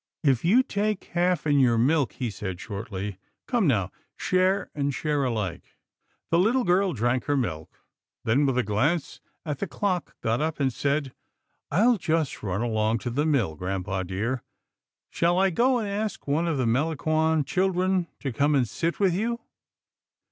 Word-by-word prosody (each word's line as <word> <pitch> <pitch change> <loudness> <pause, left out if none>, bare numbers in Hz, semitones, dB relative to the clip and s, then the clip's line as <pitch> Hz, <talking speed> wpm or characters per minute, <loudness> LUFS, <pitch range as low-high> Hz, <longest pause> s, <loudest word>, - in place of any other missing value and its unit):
"If 135 -5 +3
you 220 +10 +5
take 210 -3 -1
half 175 -1 +1
in 145 -2 +3
your 120 -3 +4
milk," 135 -1 +2
he 120 -4 -3
said 95 -3 -5
shortly, 100 -2 -5
" - - -56
come 240 -8 +2
now, 95 -9 +1 0.3
share 185 +1 +1
and 140 -1 -1
share 145 0 -1
alike." 105 -9 -3 0.5
The 170 - +4
little 235 +7 +3
girl 185 0 +2
drank 120 +1 0
her 145 -1 +1
milk, 80 - -4 0.4
then 135 +6 +2
with 130 -2 0
a 125 - +3
glance 135 +11 0 0.2
at 150 -3 -3
the 200 - -2
clock 185 -4 -2
got 115 +4 0
up 160 0 -2
and 135 -3 +1
said, 140 0 -1 0.6
"I'll 225 +9 +4
just 160 -4 -1
run 100 +2 -2
along 110 -1 +1
to 120 - -1
the 145 +6 0
mill, 125 - +1
grampa 95 +3 -3
dear. 105 +8 -2 0.7
Shall 170 +1 +2
I 190 0 +3
go 250 +8 +3
and 220 -3 -2
ask 205 -3 -3
one 155 +4 +1
of 160 -4 0
the 130 - +1
Melangon 155 +4 +1
children 185 +1 +1
to 135 -4 -3
come 145 +5 +2
and 130 -4 +2
sit 165 +9 -2
with 195 -4 +3
you? 235 +6 -1
145 Hz, 175 wpm, -26 LUFS, 115-180 Hz, 0.7 s, you